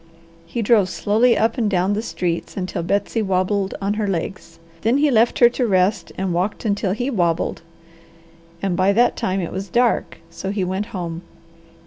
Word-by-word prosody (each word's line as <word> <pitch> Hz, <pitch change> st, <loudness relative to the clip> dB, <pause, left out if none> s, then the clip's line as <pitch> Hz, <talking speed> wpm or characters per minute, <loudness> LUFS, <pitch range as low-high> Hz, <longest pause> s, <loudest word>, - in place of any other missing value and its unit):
He 235 Hz, -, -3 dB
drove 205 Hz, -3 st, +4 dB
slowly 220 Hz, +6 st, +2 dB
up 225 Hz, +3 st, +1 dB
and 220 Hz, -3 st, +1 dB
down 190 Hz, +1 st, +1 dB
the 210 Hz, -, -1 dB
streets 175 Hz, -6 st, -3 dB
until 185 Hz, -2 st, -3 dB
Betsy 200 Hz, +5 st, 0 dB
wabbled 190 Hz, 0 st, 0 dB
on 200 Hz, +1 st, -1 dB
her 210 Hz, -, 0 dB
legs. 175 Hz, -2 st, -4 dB, 0.2 s
Then 230 Hz, +4 st, +2 dB
he 290 Hz, 0 st, +3 dB
left 230 Hz, 0 st, +3 dB
her 240 Hz, -, +7 dB
to 245 Hz, 0 st, -1 dB
rest 185 Hz, -2 st, +1 dB
and 190 Hz, -2 st, -1 dB
walked 185 Hz, +7 st, -2 dB
until 200 Hz, -2 st, 0 dB
he 245 Hz, +6 st, -2 dB
wabbled; 170 Hz, -8 st, 0 dB, 1.0 s
and 190 Hz, -3 st, 0 dB
by 190 Hz, +2 st, +3 dB
that 240 Hz, +4 st, +3 dB
time 190 Hz, +1 st, -1 dB
it 170 Hz, -, -4 dB
was 190 Hz, +1 st, -5 dB
dark, 240 Hz, +5 st, +1 dB
so 190 Hz, -, -5 dB
he 200 Hz, -1 st, -1 dB
went 190 Hz, +3 st, -2 dB
home. 175 Hz, -6 st, -5 dB
200 Hz, 180 wpm, -21 LUFS, 185-225 Hz, 1.0 s, her